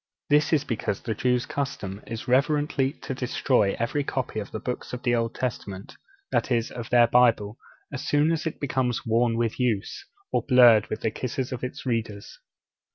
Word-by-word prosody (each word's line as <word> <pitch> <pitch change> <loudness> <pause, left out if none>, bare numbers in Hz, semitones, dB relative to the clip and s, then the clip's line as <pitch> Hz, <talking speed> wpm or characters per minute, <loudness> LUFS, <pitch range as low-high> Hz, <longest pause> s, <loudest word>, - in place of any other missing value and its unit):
This 150 +1 +4
is 150 -3 +3
because 110 -6 -3
the 110 - -2
Jews' 125 +3 +1
custom 105 -8 -4
is 115 -1 -6
reverently 140 +1 +2
to - - -3
destroy 125 -4 +1
every 120 +5 -1
copy 130 -5 -3
of 100 - -6
the 110 - -5
Books 125 +2 -5
of 125 - -5
the 120 -2 +2
Old 115 -1 0
Testament 100 -6 -5 0.4
that - - +1
is, 115 -1 +1
of 120 -2 -7
their 120 -1 +6
Bible 115 -3 +3 0.3
as 140 - -4
soon 150 +2 +2
as 165 0 -1
it 160 - -5
becomes 130 -3 -1
worn 115 0 +2
with 115 0 -1
use, 120 - -1 0.3
or - - +1
blurred 120 -5 +6
with - - -5
the 110 - 0
kisses 130 +2 -4
of 125 -1 -5
its 125 - -5
readers. 110 -4 -3
125 Hz, 185 wpm, -26 LUFS, 115-130 Hz, 0.4 s, their